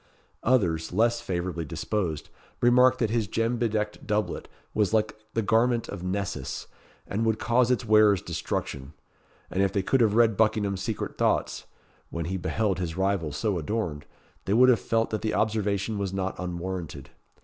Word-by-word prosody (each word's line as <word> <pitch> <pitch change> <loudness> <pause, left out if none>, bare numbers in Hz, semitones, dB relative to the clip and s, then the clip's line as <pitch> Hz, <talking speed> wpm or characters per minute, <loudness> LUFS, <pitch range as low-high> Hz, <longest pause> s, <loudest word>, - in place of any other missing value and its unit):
Others, 90 -10 +1
less 115 +4 +2
favourably 85 -2 -3
disposed, 80 +1 -3 0.3
remarked 125 +1 +5
that 115 -3 0
his 115 -3 0
gem 115 +4 0
bedecked 110 -3 -2
doublet 105 0 -1 0.3
was 105 0 +2
like 110 0 +1 0.2
the 115 - +1
garment 115 +3 +2
of 100 - -6
Nessus, 90 -7 -3 0.4
and 105 +4 -2
would 110 -1 +1
cause 120 +2 +2
its 125 -1 +1
wearer's 105 -3 +5
destruction; 75 -4 -4 0.6
and 95 - 0
if 100 -1 +2
they 100 -1 0
could 135 +6 +2
have 110 -2 +3
read 115 -2 +4
Buckingham's 105 -3 +1
secret 105 +2 -4
thoughts, - - 0 0.4
when 85 -1 -4
he 95 +3 -2
beheld 95 +1 -1
his 85 -2 -3
rival 95 -5 0
so 95 +5 -1
adorned, 80 -4 -3 0.4
they 100 - +1
would 130 +2 +7
have 125 - +5
felt 115 0 0
that 110 - -2
the 110 - -1
observation 105 -1 0
was 100 -2 -2
not 95 0 -2
unwarranted. 90 -1 -5
105 Hz, 165 wpm, -27 LUFS, 90-115 Hz, 0.6 s, would